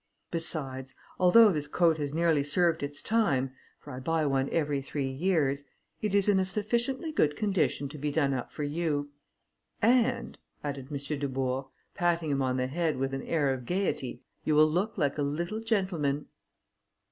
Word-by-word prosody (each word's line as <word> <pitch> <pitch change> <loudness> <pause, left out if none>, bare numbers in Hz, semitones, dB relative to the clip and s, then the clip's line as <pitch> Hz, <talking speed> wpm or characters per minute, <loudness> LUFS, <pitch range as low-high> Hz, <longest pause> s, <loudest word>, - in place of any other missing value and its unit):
Besides, 135 -6 -3 0.2
although 205 +4 +7
this 150 -4 -1
coat 165 +1 +2
has 145 -1 -2
nearly 160 -2 +2
served 165 +3 +2
its 145 0 -5
time, 145 - +1 0.3
for 145 - -11
I 125 - -5
buy 160 +3 0
one 135 -1 +1
every 145 -4 0
three 135 0 -3
years, 145 -2 +1 0.4
it 210 -2 0
is 200 0 +4
in 200 -2 +4
a - - +3
sufficiently 235 - -1
good 150 - +2
condition 190 -7 0
to 150 +1 -9
be 145 +1 -1
done 140 -2 +1
up 125 -2 -4
for 150 - -5
you. 145 -1 -1 0.7
And," 240 +2 +2 0.2
added 140 -3 -4
M. 145 - -3 0.2
Dubourg, 135 -1 -2 0.3
patting 170 -4 0
him 140 -1 +1
on 130 -1 0
the 125 - +1
head 160 +3 -1
with 135 +1 -1
an 135 - -2
air 145 -4 +1
of 125 -2 -7
gaiety, 180 -8 -2 0.2
"you 155 - +1
will 155 +1 +7
look 195 +8 -1
like 145 -3 0
a - - +2
little 170 +9 -2
gentleman." 185 -11 0
150 Hz, 175 wpm, -29 LUFS, 140-180 Hz, 0.7 s, although